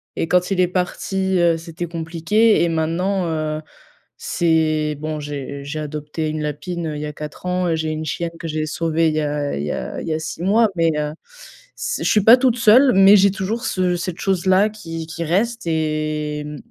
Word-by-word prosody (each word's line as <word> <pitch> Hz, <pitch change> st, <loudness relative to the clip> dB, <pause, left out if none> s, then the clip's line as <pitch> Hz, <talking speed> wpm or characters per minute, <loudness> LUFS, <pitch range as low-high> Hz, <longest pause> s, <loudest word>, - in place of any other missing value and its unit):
et 165 Hz, -, -1 dB
quand 180 Hz, +2 st, +2 dB
il 185 Hz, -, 0 dB
est 180 Hz, -, +4 dB
parti, 190 Hz, +1 st, -1 dB
heu, 170 Hz, -1 st, +3 dB
c'était 165 Hz, +1 st, -6 dB
compliqué 170 Hz, +7 st, +2 dB
et 170 Hz, -, +1 dB
maintenant, 175 Hz, +4 st, 0 dB
heu, 155 Hz, -1 st, -2 dB, 0.6 s
c'est 155 Hz, -2 st, +1 dB
bon, 155 Hz, 0 st, -4 dB
j'ai 140 Hz, -1 st, -6 dB
j'ai 155 Hz, +2 st, -4 dB
adopté 150 Hz, +1 st, -4 dB
une 155 Hz, 0 st, -3 dB
lapine, 165 Hz, +3 st, -4 dB
heu, 150 Hz, -, -4 dB
il -, -, -5 dB
y -, -, -3 dB
a 150 Hz, -, -6 dB
4 150 Hz, +4 st, -9 dB
ans 180 Hz, 0 st, 0 dB
et 165 Hz, -, +1 dB
j'ai 160 Hz, 0 st, -2 dB
une 155 Hz, 0 st, -4 dB
chienne 170 Hz, +2 st, -2 dB
que 165 Hz, -, -5 dB
j'ai 155 Hz, 0 st, -2 dB
sauvée 165 Hz, 0 st, +1 dB
il 155 Hz, -, -2 dB
y 155 Hz, -, +1 dB
a 145 Hz, -, -2 dB
il 70 Hz, -, -3 dB
y 75 Hz, -, -2 dB
a -, -, -4 dB
il -, -, -7 dB
y 160 Hz, -, 0 dB
a 155 Hz, -, -1 dB
6 160 Hz, +2 st, -6 dB
mois, 215 Hz, +3 st, +4 dB
mais, 165 Hz, -1 st, +2 dB
heu, 150 Hz, 0 st, -2 dB, 0.6 s
c'est -, -, -3 dB
je -, -, +3 dB
suis 210 Hz, -, +4 dB
pas 230 Hz, +5 st, +8 dB
toute 250 Hz, -2 st, +2 dB
seule, 240 Hz, +4 st, +6 dB
mais 195 Hz, +2 st, +7 dB
j'ai 195 Hz, 0 st, +4 dB
toujours 215 Hz, +6 st, -3 dB
ce 180 Hz, -1 st, 0 dB
cette 180 Hz, +1 st, -5 dB
chose-là 190 Hz, +2 st, +2 dB
qui 165 Hz, -6 st, -7 dB
qui 165 Hz, +1 st, -5 dB
reste 225 Hz, +6 st, 0 dB
et 155 Hz, -1 st, -1 dB
mmh, 150 Hz, 0 st, -7 dB
165 Hz, 220 wpm, -20 LUFS, 155-185 Hz, 0.6 s, pas